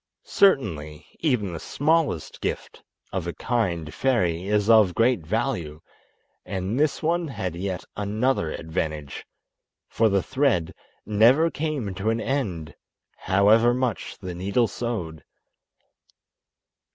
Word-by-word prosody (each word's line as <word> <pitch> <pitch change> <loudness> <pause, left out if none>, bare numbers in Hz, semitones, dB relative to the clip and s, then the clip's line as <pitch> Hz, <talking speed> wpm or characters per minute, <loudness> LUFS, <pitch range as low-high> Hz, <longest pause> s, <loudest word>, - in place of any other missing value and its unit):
Certainly 80 - +1
even 120 - 0
the 80 - -5
smallest 150 - 0
gift - - -4 0.3
of 95 -3 -2
a 85 - -3
kind 85 -7 -2
fairy 95 -9 0
is 105 0 +1
of 110 -6 +5
great 120 0 +3
value, 95 - -2 0.6
and 95 +5 -3
this 155 +2 +1
one 170 +1 +1
had 95 - -4
yet 90 0 -4
another 105 -3 0
advantage, 75 -2 -4 0.6
for 110 -1 +2
the 100 -2 +1
thread 130 - 0 0.3
never 120 +11 +4
came 145 -10 -3
to 95 +4 -2
an 115 +1 0
end, 95 - -2 0.4
however 105 +5 +4
much 125 -3 -2
the 90 -2 -6
needle 100 +7 +1
sewed. 95 -12 -4
105 Hz, 115 wpm, -24 LUFS, 85-130 Hz, 0.6 s, of